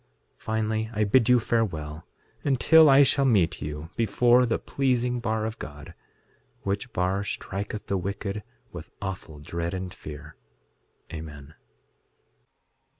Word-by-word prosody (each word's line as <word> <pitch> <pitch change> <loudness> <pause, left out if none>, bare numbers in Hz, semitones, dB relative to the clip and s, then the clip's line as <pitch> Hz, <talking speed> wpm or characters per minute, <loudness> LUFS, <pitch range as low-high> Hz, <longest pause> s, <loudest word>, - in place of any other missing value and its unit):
6:13 - - -39
Finally, 110 0 -1
I 105 0 +1
bid 115 +3 +3
you 125 -1 +6
farewell, 80 -10 -2 0.4
until 150 +3 +6
I 140 +1 +8
shall 140 +1 +3
meet 95 -9 +2
you 75 +2 -6
before 120 +3 +4
the 115 - +1
pleasing 125 -2 0
bar 110 -1 -1
of 110 +1 -5
God, 75 0 -9 0.7
which 100 +5 -2
bar 95 +2 0
striketh 100 +1 -5
the 100 - -1
wicked 100 +2 -4 0.3
with - - -9
awful 95 -5 -6
dread 85 +4 -4
and 95 -1 -5
fear. 75 -2 -10 0.8
Amen. 75 -2 -8
100 Hz, 130 wpm, -26 LUFS, 85-120 Hz, 0.8 s, I